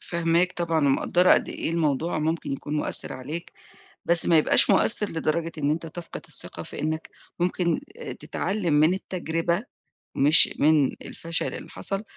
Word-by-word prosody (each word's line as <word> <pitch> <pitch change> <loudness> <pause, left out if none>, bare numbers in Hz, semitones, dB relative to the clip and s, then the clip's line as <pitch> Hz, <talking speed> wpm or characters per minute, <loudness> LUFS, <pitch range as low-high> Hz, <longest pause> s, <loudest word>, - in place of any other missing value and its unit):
فاهماك 170 +1 0
طبعًا، 165 -4 0
ومقدّرة 175 +6 +3
قد - - +2
إيه - - -3
الموضوع 160 0 0
ممكن 160 -1 -2
يكون 145 +2 -4
مؤثر 150 - 0
عليك، 155 +7 -7 0.5
بس 170 -1 +3
ما 165 -2 +5
يبقاش 155 - +4
مؤثر 210 -2 +2
لدرجة 165 +1 -2
إن 145 -1 0
أنت 165 +2 -3
تفقد 165 +1 -8
الثقة - - -4
في - - -9
إنّك 155 +1 -3 0.3
ممكن 180 +6 0 0.2
آآ 475 - -6
تتعلم 195 -6 -3
من 155 +4 +4
التجربة 170 0 -2 0.5
مش 145 +4 +7
من 150 -2 +4
الفشل 165 0 -3
اللي - - -8
حصل، 195 +1 -5
165 Hz, 155 wpm, -25 LUFS, 155-175 Hz, 0.5 s, مش